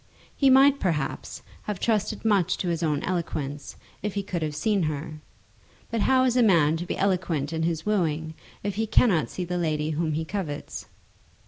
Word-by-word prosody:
He 275 Hz, -, +4 dB
might, 270 Hz, +1 st, +6 dB
perhaps, 155 Hz, -7 st, -2 dB, 0.2 s
have 210 Hz, -3 st, -3 dB
trusted 220 Hz, -1 st, 0 dB
much 195 Hz, -5 st, +2 dB
to 180 Hz, -, -2 dB
his 170 Hz, -1 st, -1 dB
own 150 Hz, -3 st, 0 dB
eloquence 150 Hz, -5 st, -3 dB, 0.3 s
if 210 Hz, -1 st, -3 dB
he 200 Hz, -, -1 dB
could 180 Hz, -3 st, -3 dB
have 155 Hz, -1 st, -2 dB
seen 200 Hz, +5 st, +1 dB
her; 155 Hz, +1 st, -6 dB, 0.7 s
but 230 Hz, -2 st, 0 dB
how 260 Hz, +2 st, +4 dB
is 250 Hz, -2 st, +2 dB
a 250 Hz, -, +4 dB
man 165 Hz, -8 st, +4 dB
to 175 Hz, +2 st, -5 dB
be -, -, -3 dB
eloquent 175 Hz, -6 st, 0 dB
in 160 Hz, -, -1 dB
his 165 Hz, -1 st, -1 dB
wooing 160 Hz, -6 st, 0 dB, 0.3 s
if 205 Hz, 0 st, -3 dB
he 220 Hz, 0 st, 0 dB
cannot 205 Hz, -6 st, +3 dB
see 180 Hz, -, -4 dB
the 180 Hz, 0 st, -2 dB
lady 155 Hz, -2 st, 0 dB
whom 155 Hz, 0 st, -1 dB
he 160 Hz, +2 st, -2 dB
covets? 160 Hz, -5 st, -5 dB
175 Hz, 190 wpm, -26 LUFS, 155-205 Hz, 0.7 s, might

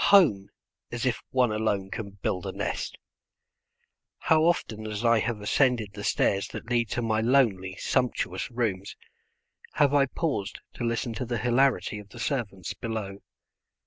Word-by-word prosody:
Home! 145 Hz, -, +5 dB, 0.4 s
As 120 Hz, 0 st, -3 dB
if 125 Hz, -, 0 dB
one 125 Hz, -3 st, +2 dB
alone 105 Hz, -3 st, -1 dB
can 105 Hz, -2 st, -4 dB
build 90 Hz, -2 st, -1 dB
a -, -, -2 dB
nest. -, -, -3 dB, 1.2 s
How 160 Hz, -1 st, +3 dB
often 110 Hz, -11 st, 0 dB
as 105 Hz, +2 st, -3 dB
I 115 Hz, -1 st, +5 dB
have 115 Hz, -1 st, -1 dB
ascended 115 Hz, -2 st, +2 dB
the 100 Hz, -, -7 dB
stairs 100 Hz, -1 st, +1 dB
that 120 Hz, -, -8 dB
lead 120 Hz, -3 st, +2 dB
to 120 Hz, -, -1 dB
my 110 Hz, -1 st, +1 dB
lonely, 110 Hz, -7 st, +2 dB
sumptuous 125 Hz, +4 st, -1 dB
rooms, 110 Hz, -6 st, -2 dB, 0.8 s
have 145 Hz, -2 st, +3 dB
I 140 Hz, -1 st, +4 dB
paused 135 Hz, -, -2 dB
to -, -, -6 dB
listen 115 Hz, 0 st, -1 dB
to 125 Hz, -, -3 dB
the 120 Hz, 0 st, -1 dB
hilarity 125 Hz, -1 st, +2 dB
of 105 Hz, 0 st, -12 dB
the 120 Hz, -, -12 dB
servants 120 Hz, -, -2 dB
below. 110 Hz, -4 st, -5 dB
115 Hz, 155 wpm, -27 LUFS, 105-125 Hz, 1.2 s, Home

